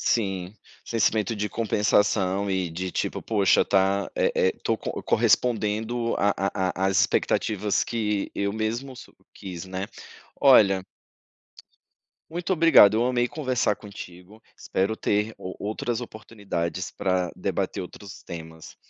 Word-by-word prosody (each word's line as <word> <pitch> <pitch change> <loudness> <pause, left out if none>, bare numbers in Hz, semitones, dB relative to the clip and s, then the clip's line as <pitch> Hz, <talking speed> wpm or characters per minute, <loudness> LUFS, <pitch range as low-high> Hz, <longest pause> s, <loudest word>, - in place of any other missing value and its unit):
Sim, 95 -3 -1 0.3
sentimento 110 0 +1
de 105 0 -2
compensação 100 -3 +1
e 95 -3 -1
de 90 +2 -4
tipo: - - -2
"Poxa 100 -4 +3
tá, 95 0 +1
eh - - +2
eh, - - +2
tô - - +1
co - - -5
correspondendo 115 0 +1
à 100 +1 +2 0.4
à 95 +1 -1
às 95 0 +3
expectativas 105 0 +1
que 105 -3 -2
eu 100 0 -1
mesmo 115 +5 -3
su - - -12 0.2
quis, 90 -3 -7
né". 95 +1 -4 0.5
Olha 100 -9 +6 1.5
muito 175 +3 -2
obrigado, 165 - +7
eu 115 +3 +2
amei 125 -1 +1
conversar 130 -8 0
contigo, 100 +1 -11
espero 100 +4 -1
ter 105 +2 0
o 95 - -7
outras 110 +3 -2
oportunidades 100 -6 -5
pra 90 -2 -1
debater - - -2
outros 100 +3 -9
temas. 80 -1 -9
105 Hz, 125 wpm, -25 LUFS, 95-115 Hz, 1.5 s, obrigado